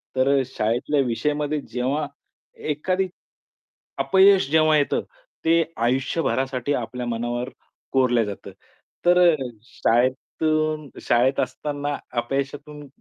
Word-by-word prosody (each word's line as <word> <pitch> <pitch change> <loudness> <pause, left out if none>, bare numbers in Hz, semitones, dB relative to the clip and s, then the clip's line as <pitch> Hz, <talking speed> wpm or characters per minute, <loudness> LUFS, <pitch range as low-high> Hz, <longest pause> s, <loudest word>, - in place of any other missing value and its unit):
तर 130 +1 +2
अ, - - +3
शाळेतल्या 125 +4 0
विषयामध्ये 150 +5 -1
जेव्हा 140 +5 -2 0.6
एखादी, 185 +6 0 0.9
अपयश 190 -5 +5
जेव्हा 155 -1 +5
येतं, 145 - +1 0.4
ते 165 +1 +4
आयुष्यभरासाठी 130 +1 0
आपल्या 125 -1 -3
मनावर 120 +2 -2 0.4
कोरलं 125 -3 +3
जातं. 100 -1 -7 0.5
तर 175 0 +5
अ, - - +1 0.3
शाळेतून 150 +6 0
शाळेत 125 +3 +2
असताना 145 -1 -2 0.2
अपयशातून 140 +3 -4
140 Hz, 95 wpm, -23 LUFS, 125-150 Hz, 0.9 s, अपयश